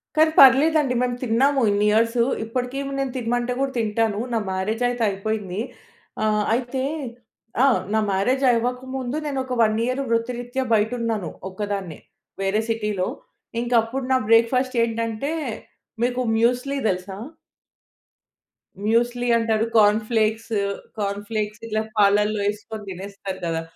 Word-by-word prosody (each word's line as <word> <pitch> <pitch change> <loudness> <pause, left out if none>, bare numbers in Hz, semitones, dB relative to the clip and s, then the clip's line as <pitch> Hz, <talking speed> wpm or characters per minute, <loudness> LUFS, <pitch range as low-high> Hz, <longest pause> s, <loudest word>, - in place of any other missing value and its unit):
కానీ 315 0 +5
పర్లేదండి. 275 +1 +6
మేము 245 -1 0
తిన్నాము 265 +4 +2
ఇన్ని 205 +1 +2
ఇయర్సు. 230 +2 +3 0.2
ఇప్పటికి 250 +3 -3 0.2
నేను 270 -1 -1
తినమంటే 245 +1 -1
కూడా 275 0 0
తింటాను. 220 -1 0
నా 230 - +2
మ్యారేజ్ 210 +5 -1
అయితే 245 -1 -2
అయిపోయింది. 200 -1 -3 0.6
ఆహ్, 210 -1 +2
అయితే 255 +2 -2 0.8
ఆ! - - +7 0.3
నా 220 - +3
మ్యారేజ్ 250 +8 +1
అవ్వకముందు. 250 +3 -2
నేను 280 -2 -2
ఒక 255 -1 -5
1 215 -1 +3
ఇయర్ 255 +2 -1
వృత్తిరీత్యా 245 +2 -1
బయట 220 +1 +2
ఉన్నాను 220 -7 -2 0.2
ఒక్కదాన్నే. 195 -3 -4 0.4
వేరే 195 +3 +1
సిటీలో. 210 -4 -1 0.5
ఇంక 240 +1 -4
అప్పుడు 255 +4 -4
నా 260 - +5
బ్రేక్‌ఫాస్ట్ 250 +3 +3
ఏంటంటే, 230 +4 -2 0.7
మీకు 250 +1 0
మ్యూస్లీ 250 +5 +1
తెలుసా? 190 +1 -2 1.7
మ్యూస్లీ 240 +2 +1
అంటారు. 225 -1 +1
Corn 210 +1 +5
flakes. 225 0 0 0.5
కార్న్ 200 0 -2
ఫ్లేక్స్ 215 -1 -3
ఇలా 215 0 0 0.2
పాలల్లో 210 +1 +3
యేసుకొని 210 +1 -4
తినేస్తారు 195 +1 -7
కదా! 165 -1 -1
230 Hz, 125 wpm, -23 LUFS, 210-250 Hz, 1.7 s, ఆ